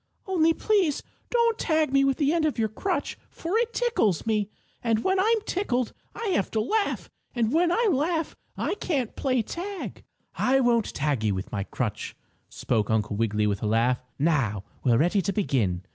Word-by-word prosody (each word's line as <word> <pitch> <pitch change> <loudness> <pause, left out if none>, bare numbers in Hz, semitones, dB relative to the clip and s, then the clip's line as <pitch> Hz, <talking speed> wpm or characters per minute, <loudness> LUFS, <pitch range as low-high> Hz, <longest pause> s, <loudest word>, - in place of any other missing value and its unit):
"Only 330 -4 +3
please 365 -4 +1 0.3
don't 470 -1 +2
tag 310 -4 +1
me 275 0 +5
with 275 -1 +2
the 295 +1 +2
end 335 -2 +1
of 300 - 0
your 220 -1 +1
crutch, 370 - -2
for 340 +5 -4
it 470 0 0
tickles 455 - +1
me, 215 -2 0 0.3
and 225 -2 +1
when 380 0 +2
I'm 440 +3 +3
tickled 255 - -1 0.2
I 455 - -3
have 275 - +1
to 220 - 0
laugh, 410 - -1 0.2
and 235 0 +1
when 340 +2 +3
I 460 +5 +2
laugh 320 +2 0 0.2
I - - -1
can't 285 - -2
play 255 -4 +1
tag." 380 - -6 0.3
"I 265 +1 +2
won't 235 -4 +2
tag 140 -6 0
you 105 -3 +1
with 95 - -5
my 100 - -2
crutch," 105 -3 -4 0.3
spoke 110 -4 -1
Uncle 105 -2 0
Wiggily 105 -1 +1
with 100 -2 0
a 110 - -1
laugh. 115 +3 +2 0.2
"Now 135 - +1 0.2
we're 120 -3 +4
ready 175 - +3
to 200 - -1
begin." 115 - 0
240 Hz, 185 wpm, -26 LUFS, -, 0.3 s, me